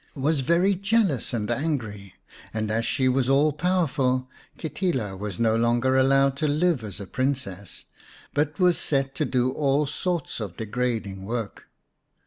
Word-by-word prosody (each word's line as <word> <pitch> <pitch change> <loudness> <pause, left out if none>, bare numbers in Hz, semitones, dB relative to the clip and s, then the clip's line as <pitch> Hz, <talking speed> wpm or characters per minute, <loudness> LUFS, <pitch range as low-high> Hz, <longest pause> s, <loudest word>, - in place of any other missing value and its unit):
xvii - - -34
Or, - - -34
the - - -10
Moss - - -4
Green 145 -3 +1
Princess - - -14
very 180 +4 +3 0.3
jealous 140 - -2
and 110 0 -2
angry, 115 - -3 0.4
and 110 -1 -1
as 115 +1 0
she 130 -2 +1
was 130 0 +2
all 145 +2 +4
powerful, 140 -7 0 0.3
Kitila 150 - -2
was 100 -1 -6
no 115 -1 +3
longer 120 +3 +2
allowed 135 +1 +4
to 155 - 0
live 150 -2 +1
as 105 -2 -7
a 100 - -6
Princess, 115 -7 -3 0.5
but 150 +1 0
was 180 -2 +4
set 135 -2 0
to - - -1
do 125 0 +1
all 140 +1 +1
sorts 165 +1 -3
of 100 -6 -6
degrading 110 -4 -2
work. 115 0 -5
130 Hz, 175 wpm, -25 LUFS, 110-150 Hz, 0.5 s, all